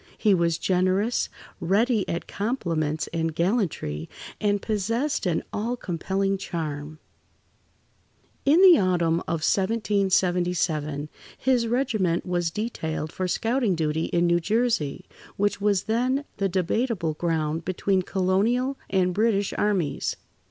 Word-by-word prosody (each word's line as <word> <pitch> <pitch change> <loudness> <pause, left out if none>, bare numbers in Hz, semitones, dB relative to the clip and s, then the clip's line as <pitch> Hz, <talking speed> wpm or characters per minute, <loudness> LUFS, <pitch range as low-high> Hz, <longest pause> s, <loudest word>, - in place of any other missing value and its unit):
He 210 -2 +3
was 170 -2 +2
generous, 185 +6 +1 0.3
ready 210 +4 +1
at 170 - -3
compliments 165 - -2
and 165 -1 -1
gallantry, 170 - -1 0.3
and 205 -1 +1
possessed 225 +5 -1
an 165 -2 0
all 235 +4 -2
compelling 195 +1 -1
charm. 155 -3 -5 1.5
In 315 +7 +5
the 360 -4 +9
autumn 170 -3 +2
of 165 -2 -1
1777, 180 -7 +1 0.3
his 250 -3 +2
regiment 225 -9 0
was 175 -2 0
detailed 160 -6 -3
for 185 +1 -2
scouting 225 +1 +1
duty 160 0 0
in 175 0 +1
New 170 0 +3
Jersey, 215 - 0 0.3
which 205 0 0
was 200 -2 +2
then 255 +5 0
the 195 -1 0
debatable 185 -1 0
ground 160 -1 -1
between 185 +2 0
colonial 205 +9 0
and 185 -2 +2
British 205 -1 +1
armies. 190 -8 0
185 Hz, 115 wpm, -25 LUFS, 165-220 Hz, 1.5 s, the